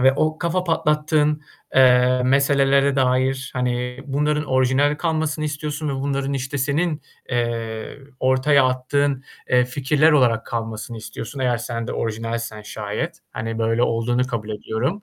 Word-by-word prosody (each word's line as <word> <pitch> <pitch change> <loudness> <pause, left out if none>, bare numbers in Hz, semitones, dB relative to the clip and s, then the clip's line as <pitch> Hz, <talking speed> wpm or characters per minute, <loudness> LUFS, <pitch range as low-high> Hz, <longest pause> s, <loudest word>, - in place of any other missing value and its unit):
ve 130 +1 +6
o 155 +3 0
kafa 180 +1 -1
patlattığın, 150 -2 +1 0.3
eee, 125 -1 +5
meselelere 140 +1 +3
dair, 130 0 +1
hani, 125 0 -2
bunların 150 +2 0
orijinal 130 +2 +2
kalmasını 155 -1 -1
istiyorsun 150 +1 -3
ve 140 - -1
bunların 140 0 -2
işte 135 +1 -3
senin, 150 +3 0 0.3
eee, 115 -1 -3 0.2
ortaya 130 +2 +4
attığın, 135 +2 0 0.3
eee, 125 0 +5
fikirler 140 +5 +2
olarak 120 -6 +3
kalmasını 115 0 -4
istiyorsun 110 +4 -7
eğer 125 -2 +2
sen 115 -1 -4
de - - -4
orijinalsen 115 0 -3
şayet. 110 +11 -4
Hani, 115 0 -4
böyle 115 +1 +1
olduğunu 120 +2 +1
kabul 115 -4 -4
ediyorum. 125 - -3
130 Hz, 135 wpm, -22 LUFS, 120-145 Hz, 0.3 s, ve